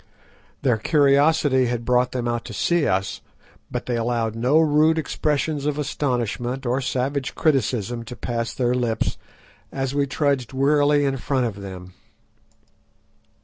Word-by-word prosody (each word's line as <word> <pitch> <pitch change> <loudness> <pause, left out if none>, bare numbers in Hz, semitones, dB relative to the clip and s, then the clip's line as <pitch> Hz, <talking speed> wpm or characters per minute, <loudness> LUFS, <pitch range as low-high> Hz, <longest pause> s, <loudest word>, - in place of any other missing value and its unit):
Their 125 -5 +3
curiosity 140 -1 +3
had 120 -1 -3
brought 125 +1 +2
them 125 -2 -2
out 120 -1 -1
to - - -7
see 170 -3 +1
us, 95 0 -1 0.5
but - - -4
they 125 - -1
allowed 115 -1 -1
no 125 +6 +2
rude 155 0 +4
expressions 150 -1 -1
of 150 -1 -1
astonishment 130 -3 -2
or 125 +3 0
savage 135 +1 -2
criticism 120 - 0
to 125 - -8
pass 115 -1 -3
their 125 -1 0
lips 120 -3 -1 0.5
as 135 0 -2
we 140 0 +1
trudged 140 -4 0
wearily 145 +1 +3
in 135 -1 0
front 130 0 0
of 100 -4 -4
them. 95 -2 -9
130 Hz, 145 wpm, -23 LUFS, 120-145 Hz, 0.5 s, rude